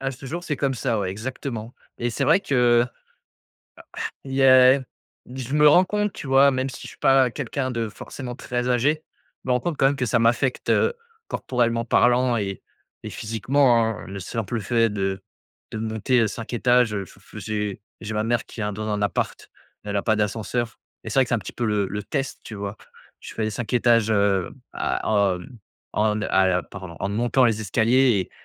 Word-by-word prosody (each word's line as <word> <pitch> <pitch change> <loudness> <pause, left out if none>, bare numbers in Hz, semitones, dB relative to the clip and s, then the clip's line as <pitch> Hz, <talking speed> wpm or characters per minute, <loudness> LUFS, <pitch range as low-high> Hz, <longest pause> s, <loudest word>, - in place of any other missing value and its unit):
À 135 0 -2
ce 135 +1 -10
jour, 170 +6 -5
c'est 150 -5 -2
comme 135 -1 0
ça, 120 -3 -1
ouais, 95 -2 -2
exactement. 120 +1 -6 0.2
Et 120 0 -1
c'est 135 +4 -1
vrai 165 +7 +4
que 120 -7 +3
a - - -20 1.3
il 135 - -6
y 135 0 +2
a 130 0 +7 0.6
je 130 +1 -5
me 150 0 +6
rends 180 +5 +6
compte, 210 +1 -1
tu 140 - -8
vois, 135 +1 +6
même 130 0 -1
si 135 - -9
je - - -7
suis - - -15
pas 135 -2 +4
quelqu'un 130 0 -3
de 115 -2 -2
forcément 125 +3 -8
très 125 0 -3
âgé, 145 +6 +1 0.4
je - - -14
me - - +3
rends 125 - +2
compte, 170 0 -3
quand 135 - +3
même, 140 - +1
que 130 - -1
ça 120 +1 +2
m'affecte, 120 +3 +1
heu, 470 - +3 0.3
corporellement 115 -2 -1
parlant 125 +1 +3
et 100 -3 -3 0.4
et - - -4
physiquement, 120 +3 +2
hein. 110 -1 -3
Le 100 +1 -6
simple 110 +4 -3
fait 115 +2 +2
de 95 -1 -2 0.5
de - - -5
monter 110 +3 0
heu, 110 - +3
5 115 +3 -7
étages, 120 -1 +3
heu, 100 -2 -3
j - - -17
f 100 - -20
j'ai 105 0 -3 0.2
j'ai 110 0 -5
ma 105 - 0
mère 115 +1 0
qui - - -12
est - - -1
un 105 - -2
dans 110 +2 -5
un 105 -1 -1
appart, 100 - -2 0.3
elle 105 0 -4
a 100 - 0
pas 110 - +2
d'ascenseur 110 +2 -2 0.3
et - - -6
c'est 135 - +2
vrai 130 - +4
que - - -12
c'est - - +2
un - - -2
petit 95 - -8
peu 120 - -2
le 105 -2 +1
le 105 +1 -4
test, 135 +3 -3
tu - - -9
vois. 100 +1 -5 0.4
Je - - -10
fais 115 - -2
les 110 - 0
5 110 +3 -5
étages, 115 -2 +3
heu, 100 -3 +2 0.2
à - - -2 0.4
hem, 90 +7 -12 0.4
en 105 0 +1
à 95 -2 +2
hem 90 -1 +2
pardon 95 -4 -9
en 100 - -2
ne 100 - -3
montant 120 +3 +3
les 110 -2 +1
escaliers 115 +2 +3
et, 90 - -4
115 Hz, 220 wpm, -23 LUFS, 105-130 Hz, 1.3 s, a